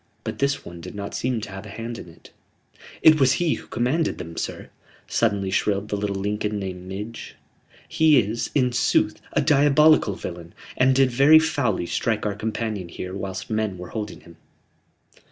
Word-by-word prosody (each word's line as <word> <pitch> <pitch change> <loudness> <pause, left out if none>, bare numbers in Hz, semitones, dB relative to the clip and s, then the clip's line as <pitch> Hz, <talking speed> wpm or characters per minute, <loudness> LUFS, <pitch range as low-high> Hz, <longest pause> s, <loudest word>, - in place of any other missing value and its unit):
But - - -5
this 140 0 0
one 85 0 -9
did 85 - -9
not 100 0 -6
seem 125 -2 -1
to 105 - -7
have 95 +1 -7
a - - -10
hand 115 +3 -6
in - - -10
it." 80 - -17 0.7
"It 155 -1 +7
was 130 -2 +5
he 170 0 +1
who - - -8
commanded 135 +8 0
them, 85 0 -8
sir," - - -5 0.3
suddenly 100 -2 0
shrilled 100 +1 0
the - - -1
little 100 -1 -2
Lincoln 105 +2 -2
named 95 -2 -6
Midge. 105 +4 -7 0.5
"He 160 -2 +4
is, 115 +1 -2
in 125 -3 +3
sooth, 120 - +1
a - - +2
diabolical 145 -5 +4
villain, 85 -2 -8 0.2
and 130 +1 +3
did 135 -1 +4
very 140 +6 +7
foully 145 - +1
strike 105 +6 -1
our 105 - 0
companion 105 -3 -3
here 90 +2 -6
whilst 100 +3 -5
men 110 -3 -1
were 90 0 -8
holding 105 -3 -6
him." 85 -1 -16
105 Hz, 180 wpm, -24 LUFS, 95-130 Hz, 0.7 s, It